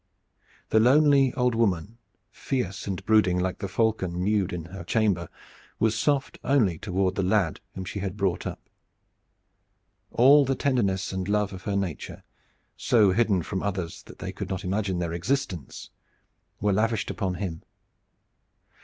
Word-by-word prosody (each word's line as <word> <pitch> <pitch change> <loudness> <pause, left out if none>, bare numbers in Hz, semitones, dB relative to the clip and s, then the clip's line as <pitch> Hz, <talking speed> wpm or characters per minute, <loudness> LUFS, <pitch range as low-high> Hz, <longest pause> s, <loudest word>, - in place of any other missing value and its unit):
The 110 - +5
lonely 135 +2 +5
old 125 -1 +2
woman, 110 -1 0 0.3
fierce 100 -8 -3
and 95 -3 -4
brooding 105 -5 +4
like 90 0 -1
the 100 - -3
falcon 95 -3 0
mewed 100 -2 +1
in 85 -2 -5
her 95 -3 -7
chamber, 95 -3 0 0.5
was 110 0 +2
soft 140 +4 0
only 110 - +2
toward 95 -2 0
the 95 - -1
lad 95 -3 +1 0.2
whom 95 - -5
she 100 - -5
had 95 0 -4
brought 95 -4 -1
up. - - -8 1.4
All 140 +4 +6
the 135 0 0
tenderness 100 -10 0
and 95 0 -3
love 105 -1 0
of 95 -1 -10
her 100 - -1
nature, 95 -6 -4 0.5
so 105 -5 +3
hidden 100 -4 +2
from 95 +3 -3
others 95 -5 -3
that - - -12
they - - -5
could - - -6
not 95 0 -3
imagine 95 0 -1
their 85 -1 -2
existence, 90 - -3 0.7
were 100 0 +1
lavished 110 +2 0
upon 95 -4 -2
him. 85 -4 -4
100 Hz, 155 wpm, -26 LUFS, 90-115 Hz, 1.4 s, All